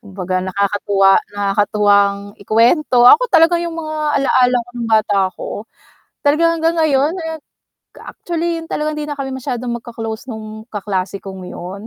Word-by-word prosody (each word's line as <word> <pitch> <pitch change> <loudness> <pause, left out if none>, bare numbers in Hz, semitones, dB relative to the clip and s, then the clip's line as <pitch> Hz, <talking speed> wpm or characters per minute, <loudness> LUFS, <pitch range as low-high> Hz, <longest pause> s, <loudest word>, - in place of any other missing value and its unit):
Kumbaga 185 -2 -4
nakakatuwa 195 +1 +2 0.2
nakakatuwang 200 0 +1
ikuwento, 240 - +3
ako 485 - +7
talaga 335 0 +4
yung 340 -1 -4
mga 310 -1 -5 0.2
alaala 255 -2 +3
ko - - -25
nung 235 -2 -5
bata 215 -2 +2
ako, 185 - -9 0.8
talaga 300 +3 +3 0.2
hanggang 330 +1 +1
ngayon 310 0 +2
eh, 320 0 -5 0.6
actually 340 -1 -4
talagang 300 0 -3
hindi 300 - -4
na 295 - -4
kami 275 -1 -5
masyadong 250 -2 -4
magka-close 225 0 -7
nung 220 -1 -8
kaklase 200 -3 -4
kong 190 -2 -8
yun, 190 +4 -8
230 Hz, 140 wpm, -17 LUFS, 200-300 Hz, 0.8 s, ako